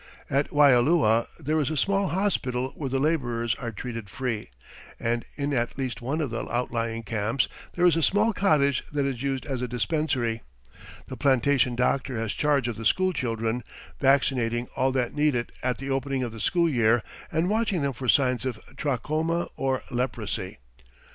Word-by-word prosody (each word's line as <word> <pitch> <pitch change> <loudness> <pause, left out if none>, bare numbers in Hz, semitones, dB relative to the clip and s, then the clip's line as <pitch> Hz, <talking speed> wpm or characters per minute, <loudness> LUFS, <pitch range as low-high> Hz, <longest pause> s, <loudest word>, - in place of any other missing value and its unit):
At 140 +2 +1
Waialua 135 -4 +4
there 155 +1 0
is 145 - 0
a 155 - -2
small 195 +6 +2
hospital 130 -11 0
where 140 -3 -4
the 135 - 0
labourers 120 -6 0
are 120 -2 -5
treated 115 -1 -6
free, 115 - -3 0.5
and 120 +1 0
in 145 0 -2
at 120 -1 -1
least 130 -3 -3
one 140 +7 -1
of 140 -6 -2
the 115 - -4
outlying 115 -1 -2
camps 115 +4 0 0.3
there 175 - +3
is 175 -3 +5
a 165 - +1
small 210 +7 +3
cottage 150 -9 +2
that 145 -1 0
is 130 -3 -2
used 135 -1 -2
as 135 -4 -3
a 125 - -1
dispensary. 125 -1 -1 0.7
The - - -7
plantation 130 -2 +3
doctor 125 +1 0
has 110 -1 -2
charge 145 -4 +1
of 115 -2 -3
the 115 - -6
school 185 - +3
children, 115 -3 -1 0.4
vaccinating 130 -4 +2
all 130 +1 +2
that 125 -2 0
need 150 -2 +2
it 120 0 -2
at 125 -1 0
the 135 0 -4
opening 135 0 -1
of 120 - -3
the 110 - -9
school 170 +8 +2
year 120 -5 +3 0.3
and 160 +3 +1
watching 210 -5 +1
them 140 -1 0
for 125 +1 -6
signs 125 -1 +3
of 125 -5 -3 0.2
trachoma 155 +5 -1
or 135 -1 -1
leprosy. 120 -6 -3
130 Hz, 180 wpm, -26 LUFS, 120-150 Hz, 0.7 s, is